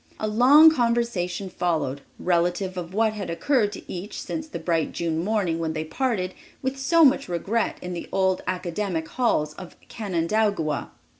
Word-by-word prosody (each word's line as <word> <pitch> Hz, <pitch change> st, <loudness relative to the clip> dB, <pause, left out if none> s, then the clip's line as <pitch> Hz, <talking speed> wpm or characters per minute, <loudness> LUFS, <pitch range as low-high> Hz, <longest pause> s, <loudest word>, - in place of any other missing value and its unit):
A 215 Hz, -, -1 dB
long 270 Hz, +9 st, +7 dB
conversation 235 Hz, -, 0 dB
followed, 155 Hz, -7 st, -1 dB, 0.2 s
relative 180 Hz, +2 st, 0 dB
to 180 Hz, -, -3 dB
what 215 Hz, +6 st, 0 dB
had 205 Hz, -3 st, -5 dB
occurred 215 Hz, +4 st, +1 dB
to -, -, -8 dB
each 185 Hz, +4 st, -6 dB
since 315 Hz, 0 st, -5 dB
the -, -, -6 dB
bright 165 Hz, -1 st, -1 dB
June 165 Hz, -1 st, -1 dB
morning 195 Hz, -5 st, 0 dB
when 160 Hz, -1 st, -2 dB
they 155 Hz, 0 st, -2 dB
parted 185 Hz, -1 st, -1 dB, 0.3 s
with 265 Hz, +1 st, -2 dB
so 325 Hz, +4 st, +5 dB
much 275 Hz, -5 st, +3 dB
regret 195 Hz, +6 st, -1 dB
in 180 Hz, 0 st, -4 dB
the 170 Hz, -, -6 dB
old 190 Hz, -1 st, +1 dB
academic 180 Hz, -2 st, -2 dB
halls 155 Hz, -12 st, 0 dB
of 185 Hz, -2 st, -10 dB
Canandaigua. 190 Hz, -5 st, -1 dB
185 Hz, 160 wpm, -25 LUFS, 170-230 Hz, 0.3 s, long